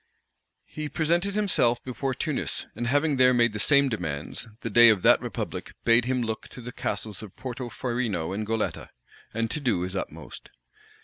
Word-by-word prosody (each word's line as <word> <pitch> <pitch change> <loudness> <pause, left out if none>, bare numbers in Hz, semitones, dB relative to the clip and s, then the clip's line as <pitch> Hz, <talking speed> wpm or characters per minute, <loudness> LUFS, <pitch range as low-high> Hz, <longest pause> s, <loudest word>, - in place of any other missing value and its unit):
He 155 -1 -6
presented 170 +6 0
himself 150 - +2
before 130 +1 -3
Tunis; 155 -5 -2
and 120 - -3
having 145 +2 +2
there 125 0 +5
made 120 -2 +3
the 105 - -4
same 140 +4 +4
demands, 80 - -4
the - - -3
dey 120 0 +8
of 105 -5 +3
that - - +6
republic - - -5
bade 115 0 +5
him 125 -1 0
look 110 -1 -4
to 125 - -11
the 125 +1 -7
castles 105 -3 -3
of 105 -4 -11
Porto 125 -1 -6
Farino 115 -10 -2
and 105 +2 -2
Goletta, 110 0 -2 0.4
and 115 0 -1
do 120 - 0
his 90 +2 -4
utmost. 95 - -7
120 Hz, 175 wpm, -26 LUFS, 110-135 Hz, 0.4 s, dey